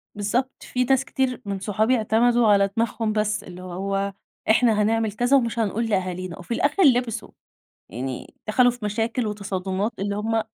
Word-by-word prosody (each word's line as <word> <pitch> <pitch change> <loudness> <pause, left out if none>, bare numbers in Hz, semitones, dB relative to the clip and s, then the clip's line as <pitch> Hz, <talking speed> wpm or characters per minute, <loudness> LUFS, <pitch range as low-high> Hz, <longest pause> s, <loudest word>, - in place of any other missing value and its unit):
بالضبط 235 +6 -2
في 250 0 -1
ناس 265 +1 +2
كتير 255 -1 -1
من 200 -1 -3
صحابي 215 +5 +1
اعتمدوا 230 +1 +3
على 200 -1 +4
دماغهم 225 -1 0
بس، 210 -1 0
اللي 180 0 -10
هو 195 +2 -3 0.4
إحنا 220 -1 +4
هنعمل 220 0 +1
كذا 245 +6 +3
ومش 235 -2 -1
هنقول 225 +2 0
لأهالينا، 185 -3 -2
وفي 180 +7 -5
الأخر 295 +10 +2
لبسوا، 245 -5 +2 0.6
يعني 130 +2 -6
دخلوا 245 +3 +5
في 240 -3 -8
مشاكل 225 +3 -1
وتصادمات 200 0 -2
اللي 200 +1 -2
هُم 225 +1 0
215 Hz, 160 wpm, -24 LUFS, 200-240 Hz, 0.6 s, دخلوا